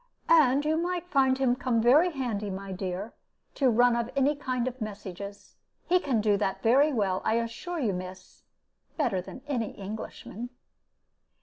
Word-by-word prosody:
"And 290 -3 +5
you 310 +1 +2
might 355 +1 -2
find 265 -5 +3
him 260 -2 +2
come 250 -3 0
very 275 +10 +5
handy, 235 -8 -3
my 195 0 -6
dear, 190 +3 -4 0.4
to 270 -3 +2
run 240 +1 +4
of 235 0 -1
any 275 +2 +3
kind 255 -3 -2
of 255 -1 -5
messages. 200 -1 -7 0.3
He 360 +1 +3
can 260 -10 0
do 205 -1 +3
that 195 -2 -2
very 270 +6 +5
well, 195 -7 0
I 220 - +1
assure 235 +10 -3
you, 225 -8 0
miss 185 +1 -8 0.6
better 235 - +1
than 255 +8 -11
any 240 -7 -2
Englishman." 215 +3 -7
240 Hz, 165 wpm, -28 LUFS, 205-275 Hz, 0.6 s, And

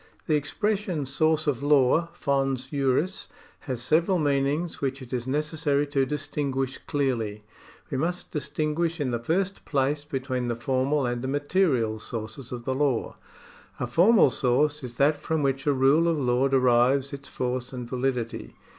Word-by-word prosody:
The 155 - 0
expression 190 +1 -1
source 155 +3 +1
of 140 -4 0
law 145 +3 +4
(fons 135 -5 0
juris) 140 +6 0 0.4
has 120 -2 -3
several 170 +7 +2
meanings 145 +2 0
which 135 -1 -1
it 130 -1 -10
is 125 0 -2
necessary 150 0 0
to 140 -2 0
distinguish 135 -2 -2
clearly. 115 -8 -1 0.5
We 130 - -1
must 175 +4 -2
distin 150 +1 -2
guish 170 +1 -1
in 135 -4 -1
the 120 - -1
first 185 +10 -1
place 145 +1 0
between 130 -3 -3
the 120 - -1
formal 130 +4 0
and 120 0 -2
the 130 - -3
material 140 - +1
sources 115 +3 -6
of 120 -1 -6
the 130 - 0
law. 135 -3 0 0.6
A - - -1
formal 175 - +5
source 145 +5 +1
is 120 -1 -8
that 145 +2 +3
from 160 0 -1
which 135 +1 -1
a - - +5
rule 140 +5 +4
of 165 -2 +2
law 125 -1 +2
derives 130 +1 +3
its 140 0 -8
force 125 0 -3
and 125 -2 -6
validity. 125 -2 -3
140 Hz, 165 wpm, -26 LUFS, 130-150 Hz, 0.6 s, formal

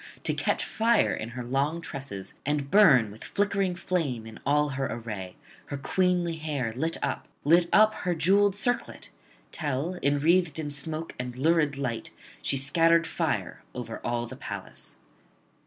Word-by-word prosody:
to - - +2
catch - - 0
fire 230 0 +2
in 110 - -4
her 125 0 -6
long 140 +6 0
tresses, 135 - -6
and 145 0 -1
burn 140 - +6
with 110 - -11
flickering 200 -2 0
flame 165 -10 -2
in 110 -1 -10
all 150 +1 +3
her 135 -1 -2
array, 105 -6 -6 0.3
her 140 - -4
queenly 175 +3 +1
hair 145 -7 -2
lit 160 +7 -1
up, - - -2 0.2
lit 170 +3 +4
up 215 0 +6
her 180 -1 0
jewelled 195 +5 +4
circlet; 245 +4 -2 0.4
till, 155 +4 -2
enwreathed 155 +3 +3
in 150 -2 -3
smoke 155 +3 -4
and 125 0 -5
lurid 150 0 +2
light, 120 -5 -3 0.3
she 135 - +2
scattered 165 +5 +4
fire - - -2
over - - -5
all 120 0 -1
the 125 +3 -8
palace. - - -7
150 Hz, 155 wpm, -27 LUFS, 130-175 Hz, 0.4 s, burn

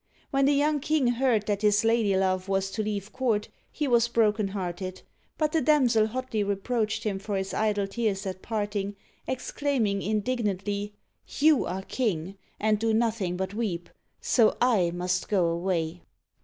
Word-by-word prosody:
When 275 -1 +3
the 285 - +4
young 295 +1 +2
king 300 0 +1
heard 240 -3 +2
that 205 -1 -1
his 210 0 +3
ladylove 195 -5 +2
was 195 0 0
to 220 - -2
leave 210 -1 -4
court, 230 -5 0 0.2
he 295 - -2
was 235 -2 +4
broken 215 -3 +2
hearted; 185 -1 -5 0.3
but 305 -1 +1
the 320 - +2
damsel 245 -7 +4
hotly 255 -1 -3
reproached 215 +2 -1
him 200 -3 -1
for 200 0 -3
his 190 0 -3
idle 210 -2 +1
tears 200 -1 -2
at 185 -1 -5
parting, 205 -2 -2 0.3
ex 260 - -3
claiming 235 -9 0
indignantly, 205 -2 -1 0.5
You 300 -1 +5
are 190 +1 -4
king, 195 -6 -2 0.2
and 215 0 +2
do 225 0 +1
nothing 220 -6 0
but 190 +1 -3
weep, 195 -6 -3 0.3
so 230 -4 +3
/ - - -27 0.3
must 180 +1 -1
go 190 -4 +3
away 170 -1 -1
210 Hz, 160 wpm, -27 LUFS, 195-235 Hz, 0.5 s, You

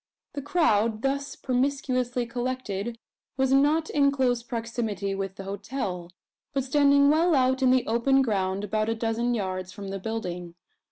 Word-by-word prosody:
The 285 - -4
crowd, 230 -8 +1
thus 280 +1 -1
promiscuously 255 -2 -1
collected, 240 -3 -3 0.4
was 265 0 +2
not 300 +4 +3
in 280 -2 +4
close 255 -3 +1
proximity 230 -5 -3
with 195 -1 -4
the 195 - -8
hotel; 195 -3 -4 0.4
but 275 -1 0
standing 280 +1 +4
well 325 +2 +3
out 260 0 +2
in 260 - +4
the 255 0 +3
open 265 +4 +3
ground, 195 -4 -1
about 215 +1 -1
a 225 - 0
dozen 230 +2 0
yards 185 -3 -3
from 200 0 -8
the 195 0 -4
building. 180 -5 -5
240 Hz, 155 wpm, -26 LUFS, 200-270 Hz, 0.4 s, in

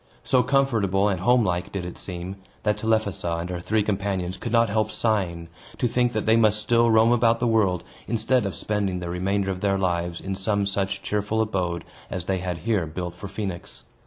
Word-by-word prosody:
So 130 - +3
comfortable 115 -8 +2
and 95 -2 -1
home 120 +6 +4
like 90 -1 -1
did 95 -3 -4
it 90 - -6
seem, 90 +1 -6 0.3
that 105 -1 +1
Telephassa 105 -6 0
and 85 +2 -4
her 90 - -3
three 105 +4 +1
companions 95 -3 -1
could 120 - -5
not 115 0 +4
help 110 +1 0
sighing, 90 -7 0 0.3
to 125 - +1
think 120 +1 +1
that 110 - -1
they 110 - +5
must 110 -2 +4
still 115 +2 +3
roam 110 +1 +5
about 115 -1 +3
the 125 - 0
world, 105 -7 +2 0.2
instead 115 +2 +1
of 95 - -5
spending 100 -3 -1
the 85 -1 -4
remainder 95 +2 0
of 90 -1 -5
their 100 -1 +2
lives 85 -2 -1
in 95 - -4
some 100 +1 0
such 100 0 -2
cheerful 105 +1 -1
abode 90 -6 -1 0.2
as 90 -2 -3
they 95 0 0
had 90 -1 -3
here 105 -8 +1
built 90 +2 -5
for 100 - -8
Phoenix. 95 -4 -6
100 Hz, 205 wpm, -25 LUFS, 90-110 Hz, 0.3 s, they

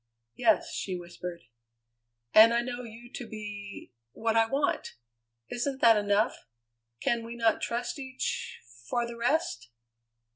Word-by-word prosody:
"Yes," 225 -3 +2
she 185 - -3
whispered. 175 0 -7 0.9
"And 225 +2 +9
I 235 - +3
know 245 0 -4
you 235 0 -10
to 245 - -6
be 205 - -8 0.2
what 225 0 0
I 225 0 +5
want. 275 +4 -1 0.6
Isn't 265 +2 -2
that 230 -1 +8
enough? 205 - +1 0.5
Can 235 -1 +1
we 230 +1 -7
not 230 -2 +2
trust 240 +4 -2
each 260 -1 -4 0.3
for 240 -1 +1
the 235 0 -7
rest?" 235 - 0
230 Hz, 135 wpm, -29 LUFS, 210-240 Hz, 0.9 s, And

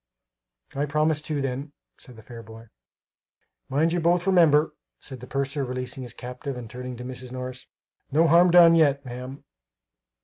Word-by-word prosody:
"I 145 +2 -1
promise, 150 +1 +1
too, 150 -2 -3
then," 135 +3 -4 0.3
said 125 - -13
the 110 - -14
fair 115 +1 -10
boy. 110 0 -14 1.0
"Mind 155 +5 +1
you 175 - 0
both 175 +1 +1
remember," 160 -5 +4 0.3
said 130 -3 -9
the 125 - -11
purser, 140 +1 -2
releasing 130 +1 -5
his 125 -2 -8
captive; 125 +2 -7
and 120 -2 -8
turning 125 +1 -8
to 125 - -8
Mrs. 125 0 -8
Morris: 125 0 -7 0.4
"No 160 +4 +3
harm 170 +3 +5
done 170 -1 +7
yet 145 -4 +3
ma'am." 125 +2 -8
135 Hz, 165 wpm, -25 LUFS, 125-155 Hz, 1.0 s, done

